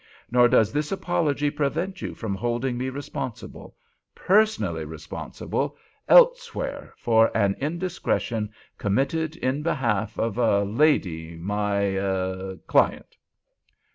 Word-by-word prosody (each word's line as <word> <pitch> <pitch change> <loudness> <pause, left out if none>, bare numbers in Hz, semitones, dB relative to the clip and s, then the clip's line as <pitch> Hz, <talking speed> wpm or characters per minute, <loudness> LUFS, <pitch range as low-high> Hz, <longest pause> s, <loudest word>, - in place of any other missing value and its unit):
Nor 120 0 +6
does 110 +1 +3
this 150 0 -1
apology 150 -6 0
prevent 155 +6 -2
you - - -5
from 110 -4 -4
holding 120 +5 -1
me 130 +2 -2
responsible—personally 145 - -2
responsible—elsewhere - - 0
for 115 -1 +3
an 100 -2 +2
indiscretion 150 - -2 0.3
committed 140 +10 0
in 135 -2 -1
behalf 115 -9 -1
of 115 +1 -1
a 100 -4 +3
lady—my—er—client." 95 - 0
120 Hz, 85 wpm, -25 LUFS, 100-150 Hz, 0.3 s, Nor